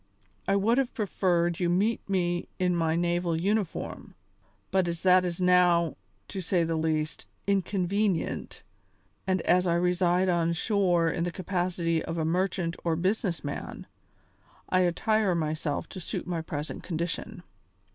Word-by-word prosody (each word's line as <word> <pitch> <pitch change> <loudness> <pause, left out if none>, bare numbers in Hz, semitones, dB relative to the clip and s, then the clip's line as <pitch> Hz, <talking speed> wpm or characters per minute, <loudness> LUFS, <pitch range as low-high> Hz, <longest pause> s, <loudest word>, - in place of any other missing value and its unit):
I 195 - +3
would 225 +6 +3
have 265 -2 -1
preferred 175 -5 +1
you 175 - +1
to 175 - +2
meet 210 +3 0
me 175 -2 0
in 180 -1 +1
my 165 -1 +1
naval 175 -1 0
uniform, 200 0 -2 0.6
but 190 -2 +2
as 170 0 -4
that 185 -1 +6
is 175 -1 -3
now, 180 -2 +4 0.3
to 195 - -4
say 175 0 +1
the 165 0 -1
least, 155 -1 -1 0.2
inconvenient, 195 -1 -1 0.6
and 185 -2 +1
as 180 +1 +3
I 170 - +2
reside 180 +1 +2
on 170 -2 +2
shore 175 -3 +2
in 170 - -1
the 175 - -1
capacity 175 -2 -1
of 165 - -4
a 160 - 0
merchant 175 0 0
or 165 -2 +1
business 185 0 -1
man, 145 -1 -6 0.8
I 185 - +3
attire 190 +2 +2
myself 155 -2 -2
to 185 - -7
suit 170 - -4
my 175 -2 -2
present 150 -1 -5
condition. 175 +3 -4
175 Hz, 150 wpm, -28 LUFS, 170-190 Hz, 0.8 s, that